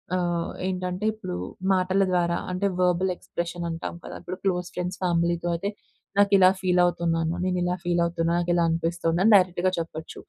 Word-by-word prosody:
ఆహ్, 175 -2 -1 0.2
ఏంటంటే 185 +2 -3
ఇప్పుడు 215 - -6 0.4
మాటల 185 +1 +2
ద్వారా 170 -1 +1
అంటే, 180 +2 -1
వెర్బల్ 180 +1 +2
ఎక్స్ప్రెషన్ 170 0 -5
అంటాం 165 +1 -5
కదా! - - -8
ఇప్పుడు 185 +1 -6
క్లోజ్ 180 -2 0
ఫ్రెండ్స్ 180 +1 -3
ఫ్యామిలీ‌తో 170 -1 +1
అయితే, 200 +4 -2 0.5
నాకు 205 0 +4
ఇలా 185 -1 +7
ఫీల్ 180 -1 +2
అవుతున్నాను. 165 -2 0
నేను 185 -1 0
ఇలా 180 0 0
ఫీల్ 175 0 +1
అవుతున్నాను. 170 0 0
నాకు 175 0 0
ఇలా 175 -1 +3
అనిపిస్తుంది, 165 0 0
అని 220 - +5
డైరెక్ట్‌గా 185 -1 +3
చెప్పొచ్చు. 160 -1 -6
175 Hz, 170 wpm, -25 LUFS, 170-185 Hz, 0.5 s, ఇలా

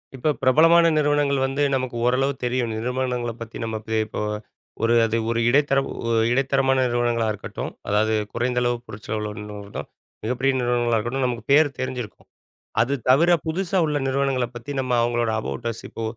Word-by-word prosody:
இப்ப 140 +4 +1
பிரபலமான 165 +6 +6
நிறுவனங்கள் 145 -2 +2
வந்து 135 +2 -1
நமக்கு 130 -2 -1
ஓரளவு 135 +3 +2
தெரியும். 120 -1 0
நிறுவனங்கள 125 +1 -2
பத்தி 115 -1 -7
நம்ம 110 -1 -3
இப்பயே 110 0 -1
இப்போ 110 - -5 0.6
ஒரு 115 +1 +3
அது 115 0 0
ஒரு 115 0 0
இடைத்தர 140 +1 +3 0.3
ஒ - - 0 0.2
இடைத்தரமான 135 +1 +2
நிறுவனங்களா 120 -1 0
இருக்கட்டும். 105 - -6 0.2
அதாவது 110 +2 +2 0.2
குறைந்த 125 +1 0
அளவு 120 0 +1
பொருட்செலவில 105 0 -5
உள்ள 105 -1 -8
நிறுவனம். 100 0 -7 0.4
மிகப்பெரிய 125 +4 +1
நிறுவனங்களா 120 -1 +1
இருக்கட்டும், 120 +4 -1
நமக்கு 120 -3 -3
பேரு 150 +1 +6
தெரிஞ்சிருக்கும். 130 -4 -5 0.5
அது 140 - +1 0.2
தவிர, 160 +7 +5 0.2
புதுசா 185 +3 -1
உள்ள 150 -1 0
நிறுவனங்கள 135 -1 +1
பத்தி, 120 +4 -7
நம்ம 130 -1 -2
அவங்களோட 120 -1 +1
அபௌட் 115 +1 -4
அஸ், 115 - -10
இப்போ 115 - -6
125 Hz, 160 wpm, -23 LUFS, 115-135 Hz, 0.6 s, பிரபலமான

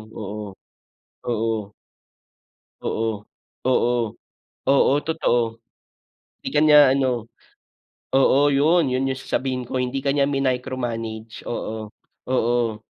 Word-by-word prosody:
oo. 105 -1 -6 0.7
Oo. 110 -3 -2 1.1
Oo. 115 0 -1 0.6
Oo. 120 -1 +3 0.8
Oo, 140 -1 +5
totoo. 120 -8 0 0.9
'Di - - -4
ka 145 - +1
niya 150 -3 +7
ano 125 -4 0 0.8
oo 135 +1 +5
yun, 155 +3 +4
yun 135 +1 0
yung 130 - -2
sasabihin 130 -1 -2
ko, - - -5
hindi 125 +2 -2
ka 140 0 +1
niya 140 -1 +2
minicromanage. 120 -4 -3
Oo, 110 -2 -4 0.4
oo. 120 -3 0
125 Hz, 100 wpm, -23 LUFS, 115-135 Hz, 1.1 s, niya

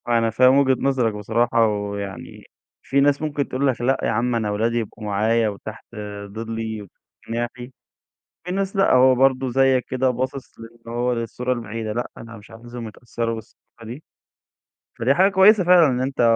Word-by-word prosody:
أنا 115 -1 +2
فاهم 130 +4 +4
وجهة 135 -2 +4
نظرك 130 -5 +1
بصراحة، 115 +2 +1
ويعني 100 -2 -5 0.4
في 140 - 0
ناس 140 0 +2
ممكن 145 -2 -2
تقول 135 +2 -1
لك 125 -4 -1
لأ 135 +2 +2
يا - - +1
عم، 120 +2 0
أنا 110 -3 -1
ولادي 115 +3 0
يبقوا 110 -1 -5
معايا 110 +2 +1
وتحت 105 +2 -9 0.4
ضِلّي 110 +1 -5 0.5
وجناحي، 120 +2 -5 0.7
وفي 180 +1 -4
ناس 195 +1 -2
لأ، 195 - +3
هو 130 0 +6
برضه 130 0 +2
زيك 130 0 +3
كده 130 0 +1
باصص 130 +2 -5
لأن 115 +1 -12 0.2
هو، 120 +1 0
للصورة 120 +2 -3
البعيدة، 115 -2 -4
لأ 120 +3 -3
أنا 115 0 -10
مش 105 -1 -15
عايزهم 120 0 -9
يتأثّروا 115 +1 -4
بالثقافة 115 +1 -14
دي، 125 +7 -8 1.0
فدي 120 +4 +3
حاجة 190 +6 +3
كويسة 195 +1 +6
فعلًا 175 -2 +6
إن 125 -2 -1
أنت 135 0 -2
120 Hz, 170 wpm, -22 LUFS, 115-135 Hz, 1.0 s, هو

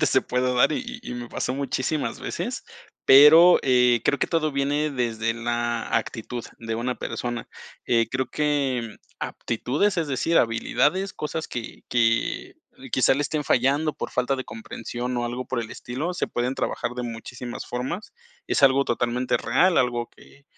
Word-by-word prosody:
totalmente - - +3
se - - +3
puede 125 0 0
dar 125 +5 +4
y 255 - -2 0.2
y - - -8
y - - -4
me 120 -1 -6
pasó 125 - -2
muchísimas 140 +2 -2
veces, - - -4 0.4
pero, 155 +6 +9
eh, 125 -2 +4
creo 145 - +2
que - - +1
todo 155 -3 0
viene 145 +2 0
desde 115 -3 -1
la 120 0 -2
actitud 120 +1 -4
de 115 -1 -4
una 120 +2 -2
persona. 120 -1 -4 0.4
Eh, 115 -1 +2
creo 130 0 -1
que 135 -6 -1 0.2
aptitudes, 145 - -1
es 165 -3 0
decir, 155 +5 0
habilidades, 145 +11 +1
cosas 160 +1 -4
que 120 -2 -7
que 115 -1 +1 0.4
quizá - - +4
le 145 - -1
estén 150 +1 -1
fallando 140 +6 +2
por - - -6
falta 125 +2 0
de 130 - -5
comprensión 120 +2 -6
o 120 - -1
algo 125 +2 -4
por 130 -2 -2
el 115 - -6
estilo, 150 +9 -4
se - - -1
pueden 125 +2 -2
trabajar 120 - -2
de 125 - -4
muchísimas 120 +1 -7
formas. 130 - -5 0.3
Es - - 0
algo 135 0 +5
totalmente 120 +1 0
real, 170 +10 +3
algo 120 -2 0
que 140 - -19
125 Hz, 170 wpm, -24 LUFS, 120-145 Hz, 0.4 s, pero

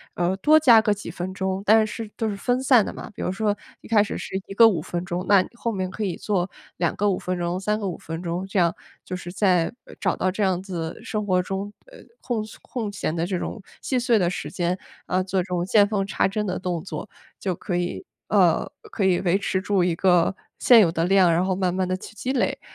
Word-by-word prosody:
呃， 175 +2 +1
多 310 +10 +5
加 235 -7 +7
个 210 -1 +2
几 205 - -8
分 185 +2 -5
钟， 190 0 -2
但 220 +1 +5
是 220 0 -6
都 225 - -1
是 205 - -2
分 245 +5 0
散 250 -6 +5
的 - - -5
嘛， - - -8
比 - - -7
如 - - -1
说 205 +1 0 0.3
一 - - -13
开 215 -2 +4
始 - - -4
是 - - -6
1 195 - -7
个 230 +2 +8
5 175 -8 +1
分 175 +2 -4
钟， 175 +1 -3
那 200 -2 +7
你 - - -7
后 235 0 -3
面 185 -3 -2
可 210 +3 -5
以 180 -4 -2
做 190 -3 -1 0.3
2 170 -1 +1
个 205 0 +2
5 185 - +1
分 180 0 -3
钟， 175 +1 -1
3 210 +2 -1
个 200 - -3
5 175 - -4
分 165 +1 -6
钟， 175 +1 -3
这 195 0 -1
样 170 -1 +2 0.3
就 185 - -4
是 175 -1 -7
在， 185 -4 +2 0.3
找 - - +1
到 185 - +1
这 205 +2 -1
样 185 -1 +1
子 170 -4 -5
生 210 -1 -3
活 185 -2 +2
中， 195 +2 -4
呃， - - -15 0.2
空 230 -4 -2 0.2
空 220 -5 -4
闲 165 -5 -3
的 165 0 0
这 185 0 -2
种 210 - -5 0.2
细 260 - -1
碎 235 -2 +3
的 175 -2 +2
时 150 - -5
间， 175 +2 -1 0.3
呃， 185 0 +1
做 190 0 -1
这 - - -5
种 180 -2 -2
见 205 +2 +5
缝 200 -2 -1
插 - - +1
针 210 +2 -2
的 185 -2 -2
动 175 -3 -3
作， 195 +2 -6 0.3
就 185 -2 -1
可 175 +1 -4
以 175 - -2 0.2
呃， - - +3 0.2
可 200 - 0
以 180 -2 +3
维 185 +1 +2
持 190 -2 -1
住 200 -2 +1
一 175 -1 +1
个 180 +1 +3 0.2
现 240 -2 +7
有 175 -6 +5
的 165 0 0
量， 185 -2 +5
然 175 +3 +2
后 185 -1 0
慢 180 -2 0
慢 185 -1 0
地 185 - 0
去 215 - -11
积 250 +5 -3
累， 260 - 0
190 Hz, 255 characters per minute, -24 LUFS, 180-210 Hz, 0.3 s, 个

